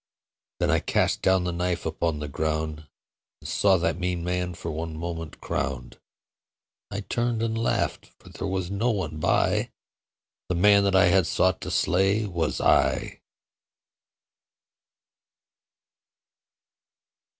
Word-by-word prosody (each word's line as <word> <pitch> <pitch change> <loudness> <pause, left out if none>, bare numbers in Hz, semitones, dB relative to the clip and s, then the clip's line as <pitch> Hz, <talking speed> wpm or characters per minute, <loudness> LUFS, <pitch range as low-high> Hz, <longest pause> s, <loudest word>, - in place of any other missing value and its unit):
Then - - +2
I - - +3
cast - - 0
down 95 -1 +3
the 90 - -1
knife 90 0 -2
upon 80 0 -1
the 75 0 -5
ground 80 +1 -3 0.5
And - - -10
saw 100 -2 +3
that 90 0 -1
mean 90 -1 -2
man 90 0 -2
for 90 - -5
one 80 0 -5
moment 80 -2 -6
crowned. 65 -1 -4 0.9
I 100 0 -4
turned 120 +2 -1
and 110 -1 -1
laughed: 115 +1 -1
for - - -16
there - - -5
was 95 -1 -2
no 110 +5 0
one 80 -9 -2
by - - +1 0.8
The 90 - 0
man 100 +3 +5
that 100 -1 +2
I 95 - +6
had 90 -1 +3
sought 95 0 +1
to - - -5
slay 95 +4 +2
was 85 -5 -2
I. - - +2
90 Hz, 130 wpm, -26 LUFS, 80-100 Hz, 0.9 s, I